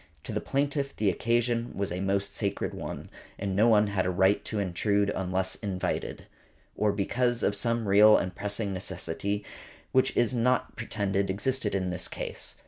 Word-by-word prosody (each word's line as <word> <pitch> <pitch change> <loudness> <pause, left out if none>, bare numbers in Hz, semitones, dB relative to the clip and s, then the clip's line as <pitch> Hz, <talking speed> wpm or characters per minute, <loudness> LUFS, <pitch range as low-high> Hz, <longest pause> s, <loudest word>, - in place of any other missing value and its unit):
To - - -6
the - - -2
plaintiff 140 0 -1
the 105 -2 +2
occasion 120 +4 0
was 100 -2 -1
a 90 - -3
most 100 +1 -1
sacred 100 -2 -2
one, - - -7 0.3
and 100 -1 -2
no 110 +4 +5
one 105 -2 +5
had 100 -2 0
a - - 0
right 95 +2 +3
to 110 - -3
intrude 100 +2 +1
unless 95 0 -1
invited, 95 -4 -3 0.5
or 105 -1 +2
because 120 +4 0
of 100 - +2
some 115 +2 0
real 105 +2 +7
and 90 -1 -2
pressing 105 +1 -2
necessity 95 +2 -3 0.5
which 130 - +4
it - - -9
is 120 0 +3
not 125 +1 +1
pretended 100 -4 -1
existed 105 +2 0
in 95 -2 -1
this 90 -1 -2
case. - - -6
100 Hz, 175 wpm, -28 LUFS, 95-115 Hz, 0.5 s, real